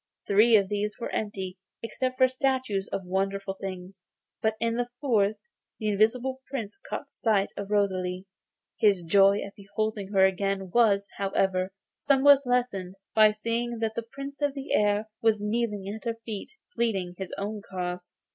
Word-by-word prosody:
Three 215 +3 +5
of 200 -2 +4
these 210 +1 -2
were 235 - -4
empty 190 -3 -3 0.2
except 255 +3 -2
for 260 - +6
statues 260 -6 -1
and 190 -2 -3
wonderful 195 +1 -1
things, 185 -1 -7 0.3
but 220 0 +1
in 230 0 +1
the 245 0 -1
fourth 215 -7 +2 0.4
the 215 - -1
Invisible 245 +6 +1
Prince 230 - -5
caught - - -5
sight 205 -3 +1
of 200 -1 -5
Rosalie. 185 -3 0 0.5
His 200 -5 +4
joy 195 +4 +5
at 200 - -8
beholding 210 0 -3
her 190 -2 +5
again 195 0 -1
was, 200 -3 +4
however, 190 -1 +1 0.3
somewhat 280 -1 +5
lessened 225 -7 0 0.2
by 215 -1 +7
seeing 230 +3 -2
that 225 -1 -1
the 235 - -2
Prince 275 +5 -9
of 290 -1 +1
the 275 +1 -4
Air 210 +1 +3 0.2
was 225 -2 +3
kneeling 210 -2 -1
at 215 +3 -6
her 230 -1 -2
feet, 215 -3 -5
and 485 - -43
pleading 195 -7 0
his 190 - -5
own 205 +1 -4
cause. 180 -2 -5
210 Hz, 165 wpm, -27 LUFS, 195-235 Hz, 0.5 s, by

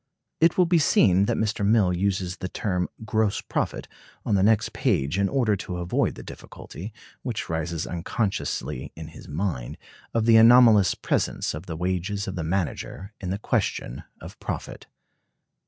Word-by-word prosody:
It 165 0 +4
will 180 - +5
be 170 0 +3
seen 100 - +4
that - - 0
Mr. 110 -1 -1
Mill 100 -3 +3
uses 95 -1 -1
the 95 - -5
term 90 -3 -2 0.2
"gross 110 -2 +1
profit" - - -3 0.4
on - - 0
the 100 - +3
next 110 +2 +2
page 90 - 0
in 100 -1 +2
order 120 -6 +2
to 90 -1 -5
avoid 85 0 0
the - - -9
difficulty, 100 +7 -9 0.3
which 120 -4 -4
rises 80 0 -2
unconsciously 85 - -3
in 80 -1 -8
his 80 - -13
mind, 75 -6 -3 0.3
of 115 -1 0
the 115 -1 +7
anomalous 115 -3 +7
presence - - -1
of 80 +5 -8
the 80 -2 -5
wages 95 +3 -2
of 95 - -3
the 85 - -4
manager 95 +3 -3
in 95 - -4
the 95 - -1
question 65 - -2 0.2
of - - -11
profit. - - -6
95 Hz, 165 wpm, -25 LUFS, 90-110 Hz, 0.4 s, the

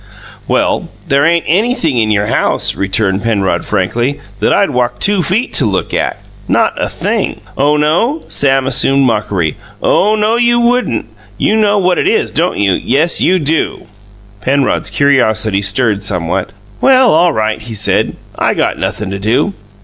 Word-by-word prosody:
"Well, - - 0 0.2
there 140 +1 +2
ain't 170 +1 +2
anything 175 - +1
in 110 -1 +1
your 105 -1 +1
house," - - +1
returned 95 0 0
Penrod 100 -4 -1
frankly, 120 +7 -1 0.2
"that - - +1
I'd - - +2
walk 125 -1 -1
two 205 -2 +1
feet 200 +8 -1
to 135 - +2
look 95 -2 -2
at - - -1 0.3
not - - +2
a - - -1
thing!" - - -2 0.2
"Oh, 145 +2 +2
no!" 175 - 0
Sam 135 -1 +2
assumed 135 +1 +2
mockery. 105 -8 -1 0.2
"Oh, 210 +2 +2
no, 215 +2 +1
you 240 0 +2
wouldn't! 240 - 0 0.3
You 215 - +1
know 210 -1 +2
what 185 -2 +1
it - - +1
is, 435 +1 +1
don't 175 +2 0
you? 100 -1 +2
Yes, 145 - +1
you 185 - +3
do!" 160 -1 -1 0.6
Penrod's 135 +4 0
curiosity 110 -8 +1
stirred 100 +1 0
somewhat. 90 -2 -2 0.3
"Well, 260 -2 +5
all 170 +2 +4
right," 110 -5 -2
he 110 0 -7
said, 105 - 0 0.2
"I - - 0
got - - -1
nothin' 105 -2 -3
to 100 - -4
do. 115 - 0
135 Hz, 165 wpm, -13 LUFS, -, 0.6 s, Well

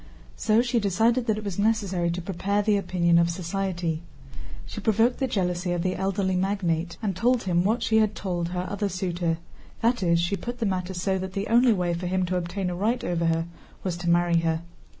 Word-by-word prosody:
So 220 +2 +3
she 240 -1 +1
decided 225 +5 +2
that 215 -1 +2
it 215 - -5
was 200 -2 -4
necessary 200 -5 +1
to 175 +1 -3
prepare 200 +3 -1
the 210 0 +3
opinion 175 -3 +2
of 170 0 +3
society. 175 -2 -2 0.6
She - - -7
provoked 225 +3 +2
the 265 - +1
jealousy 180 -4 -1
of 175 -1 -1
the 185 0 0
elderly 190 0 0
magnate 180 -3 -1
and 195 -4 -1
told 245 +5 +2
him 175 -2 +2
what 220 +5 +1
she 220 - +2
had 215 -1 +2
told 175 -3 -2
her 180 0 -3
other 205 0 -2
suitor; 175 -3 -1 0.4
that 235 0 +2
is, 170 -2 +3
she 175 +4 0
put 240 +6 -5
the 235 - -1
matter 185 -1 -2
so 190 +2 0
that 190 0 -5
the 200 +1 -2
only 240 +2 +5
way 180 -4 +1
for 175 +1 -3
him 185 0 +1
to 185 +1 -2
obtain 180 +1 -2
a - - -3
right 220 +7 0
over 170 -1 0
her 165 0 +1 0.4
was 185 -3 -1
to 175 0 -2
marry 170 0 +3
her. 165 0 0
185 Hz, 215 wpm, -26 LUFS, 175-205 Hz, 0.6 s, only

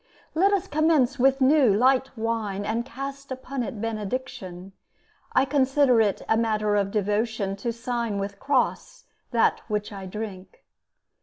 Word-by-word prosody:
Let 380 +5 +3
us 395 -2 +1
commence 300 -6 +2
with 270 +2 +3
new, 265 -3 +5
light 255 +5 +3
wine, 220 -3 -2
And 225 +3 -1
cast 275 +2 -7
upon 260 +1 -4
it 235 -2 -5
benediction; 210 -4 -5 0.6
I 260 - +4
consider 270 -3 +3
it 205 -3 0
a 220 - +3
matter 215 -2 +1
of 200 -1 +1
devotion 210 0 -1
To 235 +4 -2
sign 235 -2 -3
with 200 0 -4
cross 270 -2 -1 0.3
that 235 -2 +2
which 210 -1 -2
I 195 -1 -7
drink. 205 - -8
230 Hz, 145 wpm, -25 LUFS, 205-270 Hz, 0.6 s, new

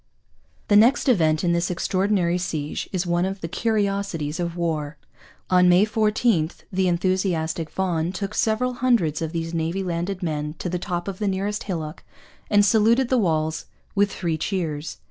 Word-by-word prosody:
The 205 - +4
next 235 +8 +5
event 160 -10 +3
in 175 - +2
this 170 +1 +1
extraordinary 185 0 +1
siege 155 -4 -3
is 185 -2 -1
one 175 0 +1
of 190 +1 -3
the 165 - -3
curiosities 200 -7 -1
of 170 0 -3
war. 155 -3 -2 0.5
On 180 0 +5
May 180 +3 +6
14 215 -5 +1 0.2
the 190 0 +2
enthusiastic 175 -3 0
Vaughan 175 -3 -1
took 195 +1 -4
several 250 +3 +1
hundreds 235 -13 +1
of 160 -1 -2
these 165 0 -3
newly 165 +4 -1
landed 180 +2 -3
men 150 -2 -2
to 180 - -4
the 180 +1 -2
top 175 -1 -3
of 195 -2 -5
the 210 - -1
nearest 200 +2 -2
hillock 160 -5 -5 0.5
and 205 -1 +5
saluted 230 +5 +3
the 255 - +3
walls 160 -5 0 0.3
with 200 0 +2
three 165 -5 -2
cheers. 160 -5 -3
180 Hz, 165 wpm, -23 LUFS, 165-200 Hz, 0.5 s, May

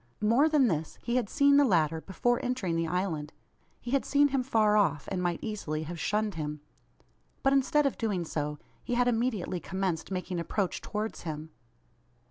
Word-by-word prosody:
More 240 +9 +4
than 295 -5 +4
this. 160 -5 -2
He 235 - -1
had 235 -5 -1
seen 280 -1 +4
the 285 - +6
latter 165 - +2
before 240 +7 0
entering 245 -9 -1
the 165 0 0
island. 160 -4 -2 0.5
He 240 - -7
had 275 0 +2
seen 285 0 +3
him 270 -1 +1
far 220 -4 +3
off, 195 -8 +2
and 180 - -1
might 175 -1 0
easily 160 -8 -3
have 165 +2 -6
shunned 210 +4 0
him. 150 -2 -4 0.8
But 270 - +4
instead 275 +2 +3
of 275 - -1
doing 200 -7 -1
so, 150 -1 -3 0.3
he 245 - -2
had 245 0 +3
immediately 225 -7 0
commenced 185 -2 -2
making 185 -2 -3
approach 185 +3 -2
towards 215 +1 -4
him! 155 -1 -6
200 Hz, 180 wpm, -29 LUFS, 165-245 Hz, 0.8 s, the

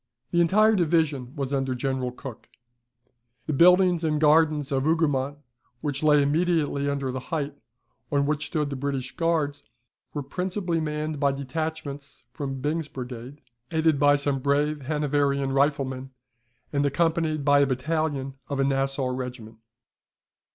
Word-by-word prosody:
The 175 - +3
entire 215 +6 +4
division 155 -7 +1
was 140 -2 -3
under 135 -2 0
General 130 0 -2
Cooke. 125 -1 -10 1.0
The 155 - -2
buildings 180 +2 +5
and 155 -2 +1
gardens 150 -1 +3
of 135 -1 +1
Hougoumont, 145 -3 +1 0.4
which 145 -2 -3
lay 150 -2 +5
immediately 150 -2 +1
under 140 -2 -2
the 130 - -3
height, 150 -4 -2 0.6
on 140 -1 +2
which 150 +1 -1
stood 150 -4 -1
the - - -2
British 135 -1 -3
Guards, 160 -4 0 0.5
were 145 - -4
principally 180 +2 -2
manned 150 -1 -3
by 140 -1 +3
detachments 145 +1 -5
from 135 0 -5
Byng's 155 +2 -1
Brigade, 125 +1 -8 0.3
aided 160 -2 +2
by 145 0 +5
some 140 -1 -1
brave 145 +1 0
Hanoverian 145 -2 +1
riflemen, 135 -2 0 0.6
and 140 0 +2
accompanied 155 0 +1
by 145 -1 +5
a 140 - +4
battalion 140 0 -1 0.2
of 140 -1 -2
a - - +3
Nassau 135 0 0
regiment. 125 -3 -6
145 Hz, 140 wpm, -26 LUFS, 135-155 Hz, 1.0 s, buildings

